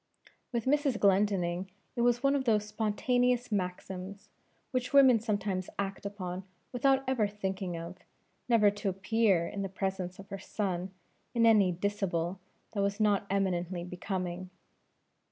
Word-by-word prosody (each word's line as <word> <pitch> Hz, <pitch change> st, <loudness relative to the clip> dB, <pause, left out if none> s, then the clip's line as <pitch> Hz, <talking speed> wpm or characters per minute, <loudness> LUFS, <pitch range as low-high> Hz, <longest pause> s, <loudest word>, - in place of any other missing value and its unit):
With 235 Hz, -3 st, -1 dB
Mrs. 280 Hz, -3 st, +2 dB
Glendinning 190 Hz, -2 st, +2 dB, 0.3 s
it 235 Hz, -, 0 dB
was 240 Hz, +1 st, +3 dB
one 275 Hz, +1 st, +4 dB
of 270 Hz, -2 st, 0 dB
those 215 Hz, -3 st, +3 dB
spontaneous 245 Hz, +3 st, +1 dB
maxims, 190 Hz, 0 st, -4 dB, 0.4 s
which 250 Hz, 0 st, -2 dB
women 265 Hz, -4 st, +7 dB
sometimes 205 Hz, -4 st, -2 dB
act 200 Hz, 0 st, -3 dB
upon 185 Hz, -2 st, -5 dB, 0.3 s
without 270 Hz, +2 st, +3 dB
ever 245 Hz, -5 st, +2 dB
thinking 190 Hz, -3 st, -3 dB
of, 170 Hz, +2 st, -7 dB, 0.5 s
never 215 Hz, -4 st, +5 dB
to 205 Hz, 0 st, -2 dB
appear 195 Hz, -2 st, +2 dB
in 200 Hz, -, -4 dB
the 195 Hz, -, -2 dB
presence 190 Hz, -1 st, -3 dB
of 195 Hz, 0 st, -12 dB
her 195 Hz, -, -4 dB
son 185 Hz, -3 st, -2 dB, 0.5 s
in 230 Hz, -1 st, +4 dB
any 210 Hz, -5 st, +6 dB
dishabille 180 Hz, -1 st, -1 dB, 0.3 s
that 205 Hz, -, -1 dB
was 200 Hz, +1 st, 0 dB
not 205 Hz, -2 st, +2 dB
eminently 180 Hz, -2 st, 0 dB
becoming. 180 Hz, 0 st, -4 dB
200 Hz, 140 wpm, -31 LUFS, 185-225 Hz, 0.5 s, women